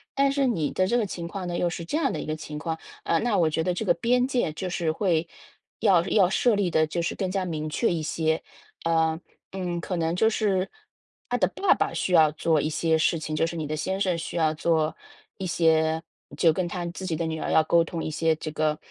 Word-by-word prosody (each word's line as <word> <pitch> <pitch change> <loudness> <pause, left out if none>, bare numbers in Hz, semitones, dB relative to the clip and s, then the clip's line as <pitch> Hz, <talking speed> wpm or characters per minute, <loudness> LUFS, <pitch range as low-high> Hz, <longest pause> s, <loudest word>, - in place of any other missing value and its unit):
但 275 0 +3
是 275 -1 +1
你 165 -12 0
的 185 - +1
这 240 +4 +2
个 230 - +1
情 175 -3 -5
况 185 +1 -5
呢， 175 - -2
又 175 - +1
是 170 0 -5
这 230 - -2
样 300 -4 +1
的 - - -3
一 - - -6
个 155 - -2
情 150 -1 -7
况。 160 +1 -4 0.2
呃， 165 - +1
那 235 -3 +1
我 165 -3 +3
觉 160 +1 -1
得 180 +2 0
这 180 - -3
个 175 - +4
边 245 +8 +2
界， 250 - 0
就 185 +4 -4
是 170 -2 0
会 170 -3 +1 0.5
要 195 -6 +5
要 195 -3 +4
设 230 +3 +3
立 200 -3 0
得 155 -1 +3
就 170 +2 -2
是 165 - -1
更 190 -2 -2
加 190 0 -1
明 155 -3 -3
确 185 +5 +1
一 165 - -2
些， 160 +1 0 0.4
呃， 160 -1 +1 0.3
嗯， 180 -2 -3
可 180 +2 -3
能 165 -1 0
就 220 +5 +3
是 195 -4 0 0.6
她 - - +1
的 - - +3
爸 400 - +2
爸 - - -1
需 - - -2
要 160 -3 +7
做 155 -1 +1
一 150 - -1
些 160 +1 +1
事 160 +1 +2
情， 155 -1 -4
就 165 - +1
是 170 - -5
你 160 -2 -3
的 155 +1 -3
先 190 +5 -2
生 185 -3 +1
需 165 - -6
要 160 -2 +2
做 160 0 +1 0.4
一 190 - -4
些 160 -1 +2 0.4
就 165 - +5
跟 180 +2 -1
他 175 0 -4
自 180 +2 -6
己 170 -3 -1
的 165 +1 -2
女 160 0 -3
儿 - - -3
要 160 - +5
沟 170 +2 +4
通 165 0 -5
一 - - -3
些 160 +1 +1
这 155 0 -6
个， 155 0 0
170 Hz, 275 characters per minute, -26 LUFS, 160-190 Hz, 0.6 s, 要